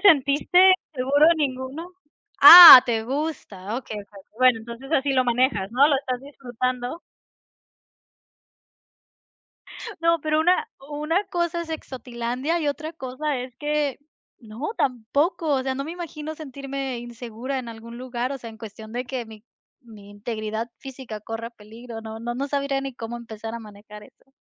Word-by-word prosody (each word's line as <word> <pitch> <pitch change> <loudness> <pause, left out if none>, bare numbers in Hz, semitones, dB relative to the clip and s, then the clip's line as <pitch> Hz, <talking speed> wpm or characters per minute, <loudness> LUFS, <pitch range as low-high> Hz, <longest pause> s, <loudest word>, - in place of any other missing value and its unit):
sentiste 285 +3 +3 0.4
seguro 280 +4 +3
ninguno? 280 +4 -4 0.5
Ah! 310 -3 +13
Te 225 -2 -1
gusta, 245 -7 -5
okey, 220 -4 -6
okey. 200 -1 -15 0.2
Bueno, 255 -3 +4
entonces, 235 +5 -10
así 275 -3 +1
lo 255 -1 +3
manejas, 240 -5 0
¿no? 270 +4 +4
Lo 300 - +2
estás 255 -2 -4
disfrutando. 255 +1 -5 3.0
No, 335 -1 +2
pero 310 0 0
una 365 +7 +2 0.2
una 315 +7 -1
cosa 345 -1 -2
es 325 - -10
exotilandia 255 +2 -4
y 295 - -1
otra 310 +3 -5
cosa 270 0 -4
es 250 -1 -8
que 295 -2 -2 0.4
no, 230 - -7
tampoco, 280 - -1
o 260 - 0
sea, 265 0 -2
no 275 +1 -4
me 325 - -6
imagino 315 -3 -7
sentirme 275 -3 -6
insegura 240 +2 -6
en 245 -2 -7
algún 230 +1 -10
lugar, 250 +1 -4
o 275 - -6
sea, 230 -2 -9
en 220 - -15
cuestión 220 0 -11
de 250 +1 -4
que 245 -1 -5
mi 220 -1 -14 0.4
mi 205 -3 -14
integridad 220 +1 -5
física 260 -5 -9
corra 225 +2 -7
peligro, 225 +1 -11
no 220 0 -9
no 240 +1 -4
no 275 +3 -3
sabría 280 -1 -1
ni 270 -1 -6
cómo 235 0 -7
empezar 225 -1 -8
a - - -5
manejar 210 -1 -13
eso. 270 - -24
255 Hz, 155 wpm, -23 LUFS, 230-290 Hz, 3.0 s, Ah